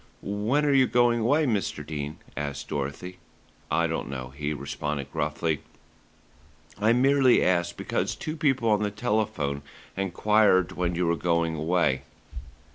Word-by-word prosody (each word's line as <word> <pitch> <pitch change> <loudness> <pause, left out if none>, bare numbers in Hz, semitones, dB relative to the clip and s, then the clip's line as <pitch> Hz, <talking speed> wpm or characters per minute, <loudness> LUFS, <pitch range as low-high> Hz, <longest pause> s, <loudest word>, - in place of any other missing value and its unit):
"When 110 +9 0
are 145 - +3
you 130 -2 +5
going 120 -1 +3
away, 145 +8 +2
Mr. 105 -8 -1
Dene?" 75 -1 -5 0.2
asked 70 0 -4
Dorothy. 75 +6 -4 0.5
"I 85 - +2
don't 80 -5 -3
know," 65 -2 -5
he 75 +2 -4
responded 70 0 -4
gruffly. 80 -3 -1 1.2
"I 110 +2 +3
merely 130 +1 +4
asked 85 -1 +1
because - - -2
two 155 - -5
people 135 -7 +1
on 105 -1 +3
the 105 - +1
telephone 100 -9 -1 0.3
enquired 95 0 +3
when 90 -1 -2
you 90 +1 0
were 85 0 +2
going 85 -1 0
away." 80 -3 +1
90 Hz, 140 wpm, -26 LUFS, 75-115 Hz, 1.2 s, you